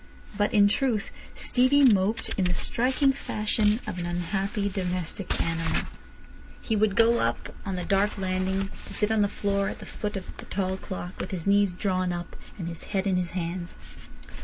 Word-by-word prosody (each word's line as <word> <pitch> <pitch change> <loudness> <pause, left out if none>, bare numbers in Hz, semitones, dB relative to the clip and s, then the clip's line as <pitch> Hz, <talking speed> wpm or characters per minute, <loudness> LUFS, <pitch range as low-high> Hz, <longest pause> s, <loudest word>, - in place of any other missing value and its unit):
But, 205 0 +1
in 205 -2 +6
truth, 225 -1 0 0.2
Stevie 265 +3 +4
moped 215 -1 +3
in 190 - 0
the 180 0 +1
striking 255 - +2
fashion 215 -3 +1
of 180 - -4
an 175 - -2
unhappy 195 +4 -1
domestic 185 0 -2
animal. 165 0 0 0.8
He 225 - -1
would 210 -1 +2
go 230 +1 +5
up 115 +1 -1
on 190 - -1
the 180 - -3
dark 200 +2 +2
landing, 190 +1 -1 0.2
to - - -8
sit 210 0 +1
on 220 -1 +3
the 205 - +4
floor 200 -1 0
at - - -6
the - - -10
foot 210 -1 -4
of 190 - -8
the - - -9
tall 190 -1 -1
clock, 185 -1 -7
with - - -3
his 180 -4 -4
knees 200 -1 +4
drawn 185 -1 0
up 175 -1 -5 0.2
and 175 -4 -4
his 170 -1 -7
head 195 -2 -1
in 195 -2 +2
his 180 -1 0
hands. 175 0 -4
195 Hz, 185 wpm, -27 LUFS, 180-210 Hz, 0.8 s, in